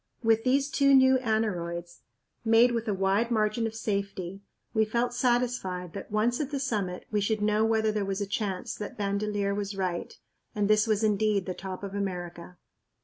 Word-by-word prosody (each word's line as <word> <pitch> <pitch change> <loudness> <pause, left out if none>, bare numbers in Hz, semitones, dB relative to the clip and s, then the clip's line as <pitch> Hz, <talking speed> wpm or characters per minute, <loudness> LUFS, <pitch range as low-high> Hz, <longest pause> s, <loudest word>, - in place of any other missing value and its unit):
With 225 0 +3
these 275 +3 +2
two 275 -3 +5
new 260 0 +6
aneroids, 175 -7 -2 0.4
made 230 +2 +5
with 230 -1 -2
a 210 - +1
wide 195 +4 +1
margin 220 0 +1
of 225 - -7
safety, 200 -3 -3 0.3
we 220 -2 +3
felt 235 +3 0
satisfied 240 -8 0
that, 200 - -7
once 220 +3 +1
at 290 -3 -2
the 285 -2 -2
summit, 205 -9 -2
we 210 -1 +1
should 215 +2 0
know 210 +1 +2
whether 220 -1 +2
there 210 -1 -1
was 195 0 -2
a 200 - -1
chance 200 -3 -3
that 210 +4 -7
Bandelier 200 0 -1
was 200 0 -4
right 180 -3 -2 0.4
and 205 -1 +1
this 215 +1 +4
was 215 0 +1
indeed 210 -2 +2
the 185 - -3
top 190 +1 -7
of 195 -1 -5
America. 180 -3 -5
210 Hz, 185 wpm, -28 LUFS, 195-230 Hz, 0.4 s, new